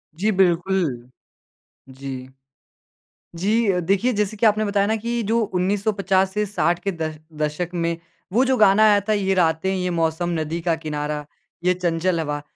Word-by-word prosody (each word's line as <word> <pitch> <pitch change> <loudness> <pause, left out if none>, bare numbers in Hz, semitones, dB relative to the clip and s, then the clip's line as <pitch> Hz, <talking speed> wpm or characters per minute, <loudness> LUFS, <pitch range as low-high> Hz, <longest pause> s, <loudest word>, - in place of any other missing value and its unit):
जी, 210 +6 +1
बिल्कुल। 175 - +1 0.8
जी। 130 -1 -7 1.1
जी 215 +6 +1
अ, 180 - 0
देखिए, 195 +8 +1
जैसे 210 0 -1
कि 225 - +2
आपने 215 0 +3
बताया 200 -1 +1
ना 220 +1 +1
कि 235 +1 -2
जो 225 +3 +1
1950 195 0 +1
से 210 +1 0
60 175 -3 0
के 195 - +1
द 160 -2 -4 0.3
दशक 150 +4 -2
में, 170 -1 -1 0.4
वो 250 +5 +4
जो 260 0 +2
गाना 210 0 +5
आया 205 -1 +5
था, - - +3
ये 195 -2 +1
रातें, 165 +1 +1
ये 180 -1 -1
मौसम, 165 +1 0
नदी 160 +2 -3
का 170 -1 +1
किनारा, 150 -1 -4 0.4
ये 180 0 +3
चंचल 175 -1 0
हवा। 145 -1 -3
185 Hz, 165 wpm, -22 LUFS, 165-205 Hz, 1.1 s, गाना